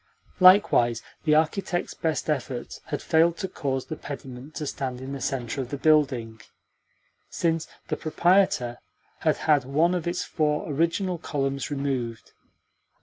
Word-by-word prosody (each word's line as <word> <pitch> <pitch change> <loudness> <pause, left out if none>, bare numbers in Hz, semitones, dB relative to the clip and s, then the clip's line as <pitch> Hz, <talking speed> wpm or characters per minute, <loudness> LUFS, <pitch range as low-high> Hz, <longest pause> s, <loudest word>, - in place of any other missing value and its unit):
Likewise, 185 - +6 0.2
the 150 -1 +4
architect's 175 +3 0
best 160 -1 -2
efforts 130 -5 -3
had - - -4
failed 165 +1 +3
to 190 - -3
cause 135 -7 -3
the 155 - -5
pediment 135 -1 -9
to 150 - -3
stand 130 -3 -4
in 130 +1 -7
the 140 - -6
centre 125 0 -2
of 125 - -6
the 140 - -4
building, 135 -7 +2 0.9
since 165 -1 0 0.2
the - - -1
proprietor 160 -7 +2 0.4
had - - +1
had 150 -4 +4
one 155 +7 +2
of 175 -2 -2
its 175 +1 -1
four 150 -2 -1
original 170 +4 0
columns 135 -4 -2
removed. 135 -5 -3
150 Hz, 145 wpm, -26 LUFS, 130-165 Hz, 0.9 s, Likewise